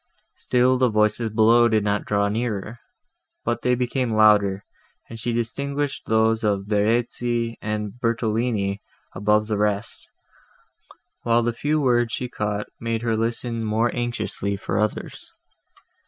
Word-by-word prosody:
Still 125 +1 +2
the 130 -1 +4
voices 105 +1 +1
below 115 +2 +5
did 110 -2 +2
not 105 0 0
draw 100 -1 +1
nearer, 110 +1 -3 0.7
but - - -1
they 125 0 +2
became 125 -1 -1
louder, 105 -2 +4 0.4
and 115 - -9
she 120 +2 -2
distinguished 140 +5 -3
those 110 0 +2
of 100 -2 0
Verezzi 115 +2 0
and 105 +1 -4
Bertolini 110 -3 0 0.3
above 105 +2 +2
the 105 -1 -2
rest, 105 +1 -2 1.1
while 120 0 +2
the 120 0 0
few 150 +6 0
words 120 -4 +2
she 125 - -2
caught 105 -3 -3
made 115 0 -2
her 115 -2 +1
listen 115 +1 -2
more 110 +2 0
anxiously 120 -4 -2
for 100 +1 -2
others. 105 0 -3
115 Hz, 135 wpm, -23 LUFS, 105-120 Hz, 1.1 s, below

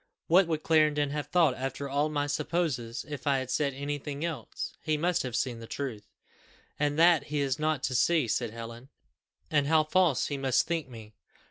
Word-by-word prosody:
What 180 +2 +5
would 160 -2 -2
Clarendon 150 -3 +3
have 150 -1 -3
thought, 160 -3 +3
after 135 +2 -4
all 145 +2 0
my 145 -1 -1
supposes, 145 -6 -2
if 145 0 -6
I 140 -1 +3
had 130 -1 -4
said 140 -3 0
any 145 +1 -3
thing 145 +2 -4
else? 150 -9 -5
he 155 -1 0
must 175 +3 +1
have 125 -3 -4
seen 120 -1 -1
the 115 - -9
truth." 125 -7 -5 0.7
"And 145 0 +1
that 170 -1 +5
he 150 0 -2
is 140 0 0
not 155 -3 0
to 130 - -1
see," 150 +2 +3
said 120 +1 0
Helen: 115 +3 -9 0.6
"and 145 -1 +2
how 160 0 +4
false 165 -3 +2
he 145 - -3
must 135 -2 +2
think 165 -5 -2
me!" 110 -3 -11
145 Hz, 200 wpm, -29 LUFS, 130-155 Hz, 0.7 s, What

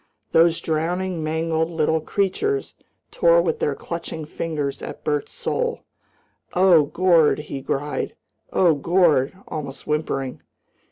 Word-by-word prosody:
Those 165 0 +4
drowning, 170 +2 -1
mangled 160 +1 0
little 160 -1 +1
creatures 205 - -1 0.4
tore 170 -1 +4
with 170 - 0
their 145 - 0
clutching 160 0 -6
fingers 150 -3 -3
at - - -8
Bert's 150 -1 -1
soul. 480 0 -2 0.7
"Oh, 180 -4 +6
Gord!" 170 0 +3
he 150 -2 -6
cried, 145 +2 -3 0.4
"Oh, 175 -3 +4
Gord!" 155 -2 +2
almost 145 -3 -6
whimpering. 135 -4 -2
160 Hz, 115 wpm, -23 LUFS, 150-175 Hz, 0.7 s, Oh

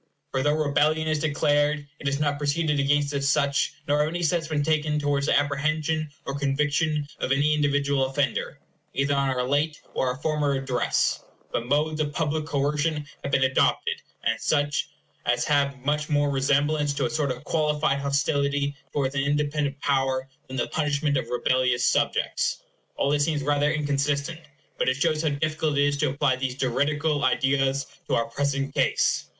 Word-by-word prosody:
For 130 - 0
though 145 +2 +2
rebellion 155 +1 +1
is 155 -1 +1
declared, 145 -1 +1
it 145 - -5
is 140 0 0
not 145 -1 0
proceeded 150 0 0
against 145 +1 +2
as 140 0 0
such, 140 -1 +1
nor 145 +1 +2
have 150 - +3
any 175 +2 -3
steps 165 0 +1
been 150 -2 0
taken 155 -1 +1
towards 145 -1 0
the - - +4
apprehension 155 +2 -1 0.2
or 140 - -3
conviction 150 +2 0
of - - -2
any 145 +2 +3
individual 140 -2 +1
offender, 135 0 -1 0.4
either 140 +1 +1
on 140 -1 +1
our 125 -1 -1
late 150 +3 0
or 130 - 0
our 125 - 0
former 150 -1 0
Address; 135 -2 0 0.3
but 120 - -2
modes 155 +3 +1
of 145 -1 -2
public 155 -1 -1
coercion 150 +1 0 0.2
have 140 - -3
been 135 - +3
adopted, 465 - +1 0.2
and - - 0
such 145 -1 0 0.4
as - - +2
have 140 -2 +1
much 150 +1 0
more 145 -1 +2
resemblance 145 +2 +1
to - - 0
a - - 0
sort 155 -2 0
of 125 -1 -4
qualified 150 -3 +1
hostility 140 0 0 0.2
towards 135 -2 0
an 140 - 0
independent 145 0 -1
power 135 -1 0 0.2
than 130 - -6
the 120 - +1
punishment 145 -1 0
of 130 - -1
rebellious 125 0 +1
subjects. - - 0 0.3
All 140 - +1
this 145 0 +2
seems 150 -2 0
rather 145 +1 +2
inconsistent; 145 +1 -1 0.4
but - - +2
it 130 - +1
shows 155 +1 +1
how 160 - +1
difficult 155 0 -1
it 140 - +4
is 145 0 +1
to 150 -1 +1
apply 140 -1 +1
these 130 -1 -2
juridical 145 +3 0
ideas 135 0 +1 0.2
to - - +1
our 115 - +1
present 140 +2 -2
case. - - +1
145 Hz, 180 wpm, -25 LUFS, 140-150 Hz, 0.4 s, the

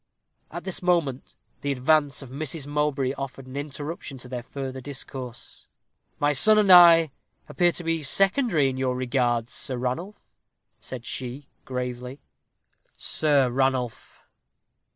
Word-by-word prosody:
At - - -7
this 190 - -3
moment 170 -8 0 0.3
the 140 - -1
advance 140 +2 +2
of 130 - -12
Mrs. 150 +1 -2
Mowbray 145 -2 0
offered 135 -1 -6
an 130 +1 -11
interruption 145 +1 -6
to 125 - -10
their 125 -1 -5
further 130 +1 -6
discourse. 130 -2 -9 0.5
"My 145 0 +2
son 215 +10 +5
and 205 -3 +4
I 170 -3 +8 0.4
appear 175 -1 +2
to 175 - -5
be 165 -1 -1
secondary 195 - +3
in 130 -1 -3
your 130 -1 0
regards, 120 -2 0
Sir 130 -3 -3
Ranulph," 130 +12 -5 0.5
said 125 -2 -8
she, 130 +2 -6 0.2
gravely. 125 +1 -5 0.8
"Sir 140 -5 +2
Ranulph!" 130 -2 -2
135 Hz, 130 wpm, -25 LUFS, 130-155 Hz, 0.8 s, I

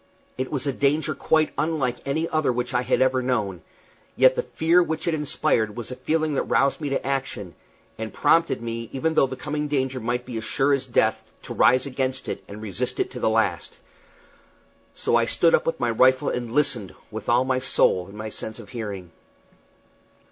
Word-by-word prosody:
It 130 0 -4
was 140 -2 -1
a 140 - 0
danger 145 +4 +1
quite 155 -1 +1
unlike 140 -6 0
any 160 +4 0
other 155 -4 +1
which 125 +1 -3
I 125 - +2
had 130 - +2
ever 130 0 +2
known; 105 -8 -1 0.5
yet 130 0 +6
the - - -1
fear 170 +3 +2
which 160 -1 -2
it 170 - +2
inspired 145 -7 0
was 120 +1 -5
a - - -4
feeling 155 +2 0
that 140 - +1
roused 140 +3 +2
me 145 - -2
to 135 - -2
action, 135 -9 -3 0.5
and 110 0 -4
prompted 150 -4 +2
me, 115 0 -5
even 160 +4 0
though 135 - +4
the 130 - -6
coming 150 +3 -3
danger 130 -3 -1
might 120 +1 -2
be 125 -3 -5
as 110 - -4
sure 135 +4 +1
as 135 -1 -1
death, 110 -2 +1
to - - -6
rise 130 +1 +4
against 130 -1 -3
it - - -4
and 105 +2 -9
resist 100 -5 -3
to - - -2
the - - +2
last. 110 0 0 1.2
So - - +1
I 120 0 +4
stood 165 +7 +3
up - - +3
with 165 0 -1
my 120 -1 +1
rifle 130 +3 +4
and 120 -2 -3
listened, 120 -8 0 0.2
with 110 0 -6
all 120 +2 +4
my 130 -1 +1
soul 95 -8 +2
in 100 +1 -12
my 110 0 -5
sense 110 +1 -7
of 110 -4 -12
hearing. 100 -7 -6
130 Hz, 200 wpm, -24 LUFS, 115-145 Hz, 1.2 s, yet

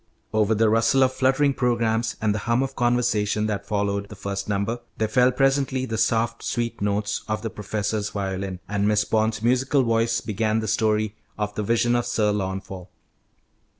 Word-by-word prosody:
Over 110 0 +2
the 110 +1 +3
rustle 115 +4 +3
of 130 0 +2
fluttering 135 +2 +2
programmes 115 -3 0
and 105 -1 +1
the 105 - -2
hum 120 +3 +3
of 135 - -5
conversation 120 -4 +1
that 105 -2 -3
followed 100 -1 -1
the 105 - -9
first 100 0 -4
number, 105 +4 -1 0.2
there 110 - +1
fell 125 +3 +4
presently 135 0 +1
the 115 - -4
soft, 115 +1 +1
sweet 115 -2 -3
notes 105 0 -1
of 110 0 -2
the 115 - -3
professor's 105 0 -2
violin, 95 -2 -4
and 100 0 0
Miss 105 -1 +2
Bond's 110 0 0
musical 130 +3 +2
voice 115 -1 +1
began 110 +1 -1
the 110 - -3
story 110 0 +1 0.2
of 105 -1 -2
the 105 - -3
Vision 115 +3 +2
of 120 0 0
Sir 110 -3 +1
Launfal. 95 -2 -4
110 Hz, 180 wpm, -24 LUFS, 105-120 Hz, 0.2 s, fell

